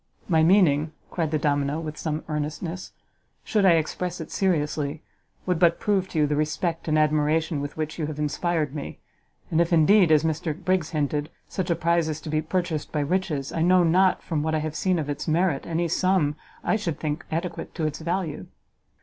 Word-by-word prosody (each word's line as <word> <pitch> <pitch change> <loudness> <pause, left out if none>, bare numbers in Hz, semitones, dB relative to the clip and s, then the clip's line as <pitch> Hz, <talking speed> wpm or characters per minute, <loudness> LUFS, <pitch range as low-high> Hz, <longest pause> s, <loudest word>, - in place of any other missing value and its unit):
"My 160 -3 +3
meaning," 160 -4 +4 0.2
cried 165 -3 -1
the 155 - +1
domino, 145 0 0
with 155 -2 -5
some 155 0 -3
earnestness, 155 +4 -4 0.5
"should 210 -4 +1
I 175 - +7
express 175 +2 -1
it 160 - -7
seriously, 150 -4 -1 0.4
would 180 -3 0
but 170 -1 +4
prove 195 -3 +1
to - - -5
you 150 - +4
the 150 0 0
respect 160 +3 -1
and 155 -1 +2
admiration 155 0 +2
with 145 +1 -6
which 155 +1 -4
you 155 - -1
have 150 -1 -6
inspired 150 0 -1
me, 150 - -6 0.5
and 165 0 +3
if 170 - 0
indeed, 175 +2 +5
as 155 0 +5
Mr 160 0 -1
Briggs 185 -3 0
hinted, 150 -1 -1 0.2
such 185 -2 -3
a 170 - +3
prize 170 0 +1
is 155 0 -3
to 155 - -7
be 155 0 +1
purchased 165 -1 -2
by 150 - 0
riches, 150 -3 -1
I 165 - -1
know 180 +1 +5
not, 185 +3 +3
from 160 -4 -1
what 160 +1 0
I - - +1
have 155 0 -4
seen 185 -2 +1
of 155 -3 -2
its 145 +2 -4
merit, 165 -2 +1
any 170 +1 0
sum 175 -4 +1 0.3
I 220 - +2
should 170 -8 -3
think 150 +1 -3
adequate 170 +1 -4
to 160 - -1
its 155 -1 -3
value." 170 -1 -3
160 Hz, 200 wpm, -25 LUFS, 150-175 Hz, 0.5 s, I